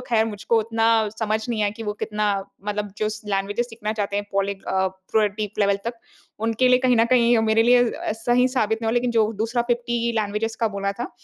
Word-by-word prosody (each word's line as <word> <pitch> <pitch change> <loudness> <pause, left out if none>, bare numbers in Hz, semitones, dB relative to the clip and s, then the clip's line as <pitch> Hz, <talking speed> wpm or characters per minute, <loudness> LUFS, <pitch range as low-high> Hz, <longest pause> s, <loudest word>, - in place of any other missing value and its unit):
ख़ैर 220 -2 +3
मुझको 225 +1 0
उतना 225 +1 +1 0.3
समझ 220 -1 0
नहीं 225 -3 -1
आया 205 - +1
कि 230 - -6
वो 210 -1 -2
कितना 210 -1 -2 0.4
मतलब 210 -1 -3
जो 215 - 0 0.2
लैंग्वेज 195 +2 -1
सीखना 220 -2 -4
चाहते 205 -2 -2
हैं। 205 0 -2
पॉलीग 195 0 -1
अ, 190 0 +1
पूरे 190 +3 0
डीप 210 0 -6
लेवल 200 -1 +3
तक 235 0 -5 0.5
उनके 230 +3 +2
लिए 250 0 +5
कहीं 255 -1 +3
न 230 - +5
कहीं 240 -2 +4
मेरे 220 +1 +4
लिए 245 +1 +5 0.4
सही 250 +1 +3
साबित 220 -4 0
नहीं - - -1
हो - - -1
लेक़िन 245 0 +1
जो 225 -2 +2
दूसरा 235 +2 0
50 240 -1 -1
लैंग्वेज़ 215 +1 -1
का 225 - +2
बोला 200 -1 -2
था, 240 +5 -6
220 Hz, 215 wpm, -23 LUFS, 205-235 Hz, 0.5 s, लिए